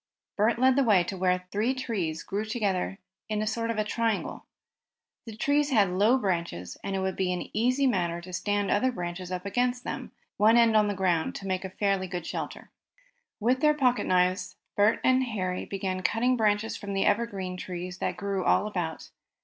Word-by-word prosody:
Bert 220 +3 +2
led 260 +1 +4
the 275 - +5
way 205 -7 +4
to 190 - -5
where 180 0 +1
three 225 +6 0
trees 195 -11 -3
grew 200 +2 -2
close 215 0 -5
together 195 -5 -1 0.3
in 215 -1 -1
a 215 - 0
sort 230 +1 -2
of 215 -2 0
triangle. 225 -2 -2 0.8
The 220 - -7
trees 285 +4 +2
had 205 -8 +3
low 210 +8 +4
branches 170 - -2
and 195 - -2
it 190 - -1
would 190 -1 -1
be 185 -1 0
an 180 - -4
easy 255 +5 +2
matter 175 -8 +1
to 180 +1 -10
stand 205 +1 0
other 255 +6 +2
branches 180 -3 -5
up 180 +1 -4
against 245 +4 0
them, - - -5 0.3
one 220 +3 +5
end 230 -2 +5
on 210 -1 +5
the 205 - -1
ground, 180 -4 +1
and - - -5
so 195 - -9
make 185 0 -1
a 190 - -4
fairly 195 0 0
good 175 -2 -5
shelter. - - -6 0.7
With 245 +4 +2
their 300 0 +4
pocket 250 -4 +2
knives 180 0 +1 0.2
Bert 205 +2 +3
and 260 0 +4
Harry 185 -7 -3
began 190 -1 -3
cutting 235 +7 +2
branches 215 -1 +1
from 200 -2 -5
the 195 - +1
evergreen 200 -4 0
trees 180 0 -6
that - - -2
grew 200 -2 -2
all - - +3
about. 175 -6 -4
200 Hz, 200 wpm, -28 LUFS, 185-230 Hz, 0.8 s, the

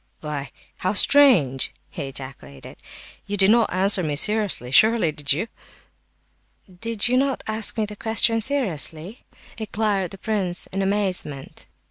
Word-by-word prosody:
"Why, 145 -3 -5 0.3
how 185 +2 -1
strange!" 200 - +4 0.2
he 140 - -5
ejaculated. 130 - -10 0.5
"You 205 0 -3
didn't 215 +4 +3
answer 190 +1 +3
me 150 -4 -2
seriously, 205 - +1
surely, 220 - +4
did 145 -1 -2
you?" 165 +11 0 1.3
"Did 230 -1 -2
not 265 +2 0
you 220 - -2
ask 220 +1 0
me 220 - 0
the 210 0 -9
question 225 +1 +2
seriously" 190 - -2 0.3
inquired 210 -4 -2
the 195 - -11
prince, 190 -4 -2
in 195 - -3
amazement. 190 -8 -2
195 Hz, 130 wpm, -22 LUFS, 150-220 Hz, 1.3 s, strange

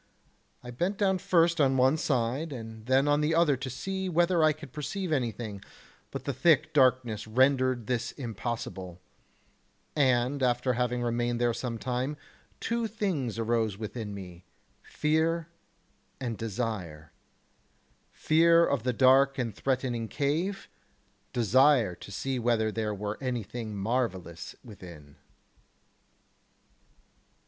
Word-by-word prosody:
I 125 - -7
bent 175 +11 -1
down 190 -3 +2
first 170 -2 +3
on 135 -1 +3
one 130 +3 +4
side 135 +1 -1
and 115 -3 -8
then 135 +2 +3
on 145 0 +3
the 155 +2 +1
other 165 -4 +4
to 130 +1 -5
see 190 +8 -3
whether 175 0 +3
I 155 - +6
could 150 -3 -10
perceive 180 +4 -4
anything, 115 -7 -2 0.5
but - - -6
the 140 - -2
thick 160 +4 +3
darkness 125 -6 +2
rendered 130 0 +2
this 125 0 -1
impossible; 110 - -5 1.0
and 130 -1 +2
after 125 0 +1
having 125 0 -1
remained 120 0 -1
there 120 -1 +2
some 120 0 -4
time, 130 +4 -2 0.4
two 235 0 -1
things 185 - -2
arose 115 -3 0
within 110 0 -5
me, 90 -2 -10 0.4
fear 160 +2 0 0.7
and 120 -3 -3
desire, 100 -9 -4 1.0
fear 165 +1 +4
of 140 -7 0
the 125 +2 -1
dark 135 +2 +5
and 120 -4 -2
threatening 125 -4 -1
cave, 155 - -1 0.6
desire 120 -2 +4
to 100 - -11
see 130 +7 -2
whether 115 -2 +1
there 105 -1 -2
were 105 +1 -4
anything 120 -3 -4
marvellous 95 -6 -2
within. 85 - -12
125 Hz, 125 wpm, -29 LUFS, 115-145 Hz, 1.0 s, I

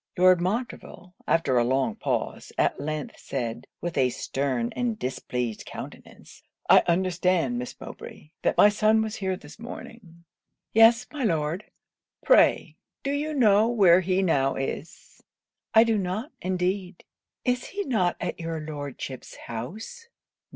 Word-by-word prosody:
Lord 180 -1 +5
Montreville, 190 -2 -4
after 135 -7 +2
a - - +3
long 130 - +1
pause, 130 - -3
at - - +1
length 150 0 -4
said, 120 -3 -4
with 170 -4 -2
a 130 -1 +4
stern 130 -2 -2
and 240 -3 -1
displeased 125 - -3
countenance, - - -10 0.3
'I - - +9
understand, 175 -6 +1
Miss 125 - -7
Mowbray, 150 - -10
that - - +1
my - - +8
son 215 +1 +3
was 220 -1 -4
here 190 -2 -2
this 145 +6 -14
morning.' 220 -7 -10 0.5
'Yes, 230 +2 +6
my 295 -3 -4
Lord.' 165 -1 0 0.6
'Pray, - - +4 0.3
do 275 - -1
you 300 +2 -2
know 215 -4 +5
where 195 -7 +5
he 185 +1 +1
now 135 -6 +2
is?' 135 +4 -6 0.5
'I 225 - +9
do 225 -2 +1
not, 200 - -3
indeed. 185 0 -2 0.4
Is 250 -1 0
he 405 +1 -4
not 195 - +1
at - - -4
your 165 -1 -3
Lordship's 145 -3 -7
house?' 210 - -7
180 Hz, 140 wpm, -26 LUFS, 145-220 Hz, 0.6 s, I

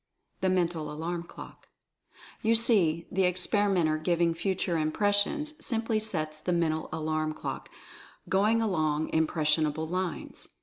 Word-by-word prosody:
THE 190 - +1
MENTAL 170 -4 0
ALARM 170 +3 -4
CLOCK. - - -12 0.7
You 225 0 +3
see, 185 -8 +3
the 190 0 +2
experimenter 180 -3 +2
giving 170 +1 +1
Future 180 +1 -1
Impres 205 +6 +2
sions 300 +7 -3
simply 225 -2 0
sets 155 -8 -3
the 180 - -2
Mental 160 -2 0
Alarm 155 -1 -2
clock - - -6 0.6
going 215 +4 +2
along 155 -6 0
"impressionable" 155 -1 +1
lines. 180 +1 -4
170 Hz, 125 wpm, -28 LUFS, 155-200 Hz, 0.7 s, You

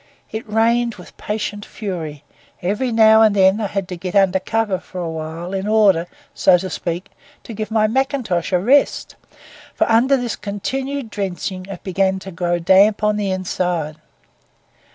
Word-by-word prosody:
It 220 0 -6
rained 230 +2 +2
with 180 - -14
patient 210 -1 -4
fury; 165 -10 -6 0.4
every 210 +8 -1
now 220 -1 +6
and 215 -2 +5
then 190 +2 +4
I 210 - 0
had 195 -2 -3
to 180 - -4
get 180 +2 -6
under 190 -1 +4
cover 215 -2 -1
for 185 - -12
a 175 - -3
while 160 +3 -6
in 195 +1 -2
order, 200 -6 +3 0.3
so 185 -2 +4
to 185 +1 -5
speak, 175 +2 -4 0.3
to 230 - -8
give 215 0 -4
my 220 -1 +2
mackintosh 230 -7 -1
a 180 - +4
rest; 255 +10 +2 0.6
for - - +1
under 245 +5 +4
this 245 -3 -3
continued 260 +5 -4
drenching 185 -1 -4
it 195 -3 -8
began 190 0 +1
to 190 0 -9
grow 175 0 -1
damp 195 +5 +4
on 210 0 +2
the 205 -2 -1
inside. 180 -4 -2
195 Hz, 170 wpm, -19 LUFS, 180-220 Hz, 0.6 s, now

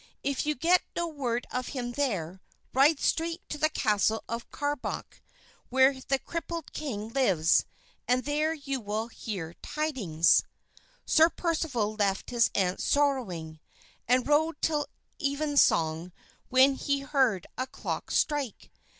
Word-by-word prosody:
If 280 +1 -1
you 300 - +1
get 345 +6 +4
no 340 0 -1
word 250 -6 -2
of 250 0 -2
him 240 -1 -3
there, 195 - -2 0.3
ride 280 +3 +5
straight 330 +1 -1
to 300 - -5
the 310 - +3
castle 220 -5 +1
of 230 0 -5
Carbonek 290 -2 -4 0.5
where 265 +1 +4
the 270 +1 0
crippled 335 +2 -6
king 225 -8 -4
lives 190 - +3 0.4
and 250 +1 +2
there 300 +2 +1
you 275 -4 -4
will 215 +2 -3
hear 185 -8 -6
tidings." 230 - +2 0.6
Sir 320 +1 +5
Percival 310 -12 -1
left 200 -1 -1
his 235 -2 +3
aunt 185 -2 +1
sorrowing, 200 - 0 0.5
and 250 +2 +3
rode 300 +1 +2
till 300 -2 0 0.3
evensong 275 - +2 0.4
when 260 +2 +6
he 280 +1 -1
heard 265 - +1
a 255 - -3
clock - - -5
strike. 290 -7 -1
265 Hz, 135 wpm, -28 LUFS, 215-295 Hz, 0.6 s, when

